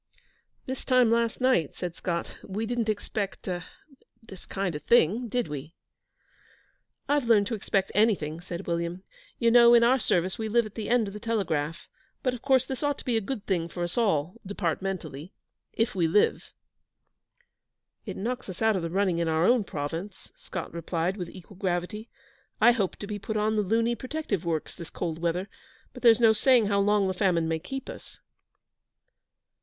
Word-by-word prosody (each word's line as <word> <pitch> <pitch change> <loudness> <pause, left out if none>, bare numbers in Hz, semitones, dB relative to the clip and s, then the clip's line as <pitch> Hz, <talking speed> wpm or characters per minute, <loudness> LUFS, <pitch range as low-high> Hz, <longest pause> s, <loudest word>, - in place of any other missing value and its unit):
'This 260 0 -5
time 255 -3 +4
last 230 -1 +1
night,' 255 - +2
said 175 -2 -4
Scott, 170 0 -3
'we 210 +3 -3
didn't 235 -1 -1
expect 205 -1 -3
er 175 -2 -2 0.6
this 195 -5 -13
kind 190 -3 -2
of 150 - -5
thing, 235 +2 +3
did 245 +1 -1
we?' 150 +2 -7 1.3
'I've 285 -2 +2
learned 220 -3 +4
to 230 - -3
expect 195 -2 -1
anything,' 180 -7 +1
said 175 +1 -6
William. 170 +2 -2 0.3
'You 230 0 +3
know, 235 0 +8
in 235 - +6
our 255 +3 +4
service, 185 -1 0
we 220 -1 -2
live 235 +1 +3
at 215 - -9
the 215 -2 -5
end 240 -3 +3
of 195 - -7
the 210 - -7
telegraph; 175 -9 -2 0.4
but, 255 -3 +1
of 245 - -7
course, 265 -2 +3
this 265 -1 -5
ought 290 -1 0
to - - -10
be 245 - +1
a 225 - +2
good 210 0 -5
thing 170 -4 -1
for 175 - -4
us 175 - -3
all, 185 -5 +1
departmentally 180 -5 -4 0.4
if 225 +2 0
we 175 -4 +2
live.' 205 +6 +2 1.6
'It 195 - -5
knocks 245 +2 -3
us 185 - -7
out 220 -1 +3
of 185 - -1
the 165 - -3
running 185 -1 +1
in 170 - 0
our 160 +1 +2
own 240 0 +4
Province,' 165 +4 -6
Scott - - -7
replied, 170 +2 -2
with 180 -4 -5
equal 185 +1 -13
gravity. 190 +4 -2 0.5
'I 240 - +7
hoped 205 -6 -1
to - - -4
be 205 0 -5
put 215 +2 -3
on 215 +1 +1
the 210 - +2
Luni 230 +4 +1
Protective 255 - -3
Works 160 -2 -2
this 170 -3 -9
cold 165 -2 -4
weather; 175 +3 -1 0.5
but - - -10
there's 230 -2 +6
no 225 -2 +6
saying 245 0 +4
how 200 -1 +2
long 205 0 +3
the 185 - 0
famine 180 -4 +1
may 160 0 -1
keep 270 +11 -6
us.' - - -10
200 Hz, 190 wpm, -27 LUFS, 175-230 Hz, 1.6 s, know